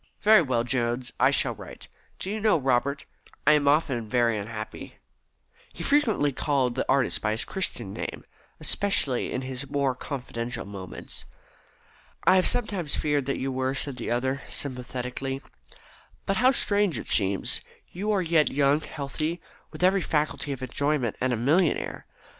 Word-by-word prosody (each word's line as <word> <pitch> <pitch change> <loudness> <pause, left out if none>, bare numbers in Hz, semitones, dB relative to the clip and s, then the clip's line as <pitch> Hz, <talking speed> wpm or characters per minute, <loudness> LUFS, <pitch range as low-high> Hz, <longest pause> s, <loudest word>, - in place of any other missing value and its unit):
Very 215 -2 +7
well, 125 -6 0
Jones. 120 0 -1
I - - +6
shall - - +3
write. - - -11 0.3
Do 190 - -4
you 215 - -2
know, 215 -4 +4
Robert, 135 0 0 0.4
I - - +7
am 150 -1 +3
often 135 -7 +2
very 120 -1 +2
unhappy." 110 +1 -6 0.8
He - - -7
frequently 235 - +2
called 135 -2 0
the 130 - -5
young 135 - +5
artist 135 - 0
by 105 0 0
his 110 - -2
Christian 120 - -3
name, - - -6 0.3
especially 150 -11 +2
in 130 - -2
his 130 +1 -5
more 140 -2 +1
confidential 125 -2 -5
moments. 100 -2 -8 1.0
"I 185 - +6
have 185 - +4
sometimes 200 -10 0
feared 145 -3 0
that 140 - 0
you 135 +1 -2
were," 130 +1 -1
said 135 -1 -2
the 120 - -4
other 130 +3 0
sympathetically. 125 0 -4 0.9
"But 195 - 0
how 250 +3 +5
strange 205 - +2
it - - -5
seems, 95 -2 +2 0.3
you 195 +4 -5
who 215 - +3
are 190 - +1
yet 165 -2 +3
young, 140 +2 +2
healthy, 155 +3 -4 0.3
with - - -6
every 190 +1 +4
faculty 150 -3 -1
for 130 0 -6
enjoyment, 140 -2 0
and 130 0 +1
a - - +2
millionaire." 155 +8 +1
140 Hz, 165 wpm, -26 LUFS, 125-160 Hz, 1.0 s, Very